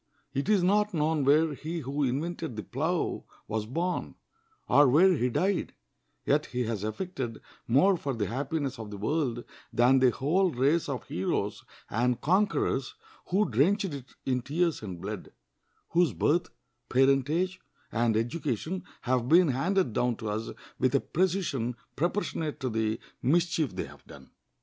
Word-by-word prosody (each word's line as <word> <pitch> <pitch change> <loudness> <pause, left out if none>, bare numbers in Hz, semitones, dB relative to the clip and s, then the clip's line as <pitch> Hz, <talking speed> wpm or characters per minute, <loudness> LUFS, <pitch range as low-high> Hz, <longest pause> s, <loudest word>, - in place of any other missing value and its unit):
It 140 +7 -1
is 205 -4 +4
not 210 +1 +2
known 155 -1 +1
where 150 +3 +4
he 160 +4 -5
who 140 +2 -3
invented 150 +1 -2
the 110 - -5
plow 160 +6 -1 0.2
was 110 0 -2
born, 170 +8 -2 0.5
or 145 0 +6
where 175 +9 +6
he 125 -6 +1
died; 190 +9 0 0.5
yet - - +2
he 125 0 -2
has 110 -3 -3
effected 120 - -4 0.3
more 145 +12 +5
for 140 -5 -3
the 105 -3 -1
happiness 135 +2 -2
of 110 -2 -6
the 105 - -7
world 120 +1 -1 0.3
than 125 +3 +4
the 130 -1 +5
whole 170 +10 +2
race 145 +3 +1
of 130 -4 -3
heroes 95 +3 -2 0.2
and 120 +2 0
conquerors 190 - +1 0.3
who 200 +3 +2
drenched 185 - +2
it 135 -2 -9
in 125 -1 +1
tears 165 +6 0
and 95 -5 -6
blood, 105 0 -6 0.6
whose 175 -1 +3
birth, 170 +4 +1 0.4
parentage, 140 +8 +2 0.3
and 115 -1 +2
education 155 - -2 0.2
have 125 -1 0
been 170 0 +6
handed 165 - +1
down 120 +1 +1
to 110 -1 -4
us 110 +2 -3 0.3
with 130 +1 +2
a - - +5
precision 165 -11 -1 0.2
proportionate 165 -2 -1
to 130 -2 -2
the 110 0 0 0.2
mischief 165 +2 +1
they - - -2
have - - -14
done. 70 -2 -14
140 Hz, 155 wpm, -29 LUFS, 120-170 Hz, 0.6 s, or